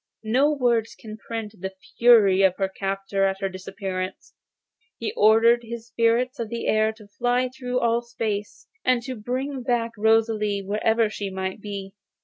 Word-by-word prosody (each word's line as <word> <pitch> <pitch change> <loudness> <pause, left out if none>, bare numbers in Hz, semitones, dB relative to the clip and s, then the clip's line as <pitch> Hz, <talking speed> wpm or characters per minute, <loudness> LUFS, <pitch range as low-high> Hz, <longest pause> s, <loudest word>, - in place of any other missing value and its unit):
No 260 +7 +3
words 240 -6 +1
can 215 -1 -8
paint 225 -2 -4
the 190 0 -5 0.2
fury 215 -6 +6
of 190 -2 +4
her 195 - +1
captor 195 0 -2
at 195 0 +1
her 195 -1 -1
disappearance. 185 0 -6 0.6
He 425 - -3
ordered 225 +2 +5
the 235 0 -6
spirits 235 +2 0
of 230 -2 -3
the 235 0 -4
air 215 0 +2
to 220 -1 -16
fly 245 +5 0
through 250 -1 -4
all 235 0 +2
space, 220 -3 -4 0.2
and 250 -2 +2
to 260 +1 -4
bring 255 +4 -3
back 240 -2 0
Rosalie 215 -2 +2
wherever 220 +3 +1
she 200 -2 -4
might 190 +1 -4
be. 200 -2 -6
220 Hz, 160 wpm, -24 LUFS, 200-235 Hz, 0.6 s, fury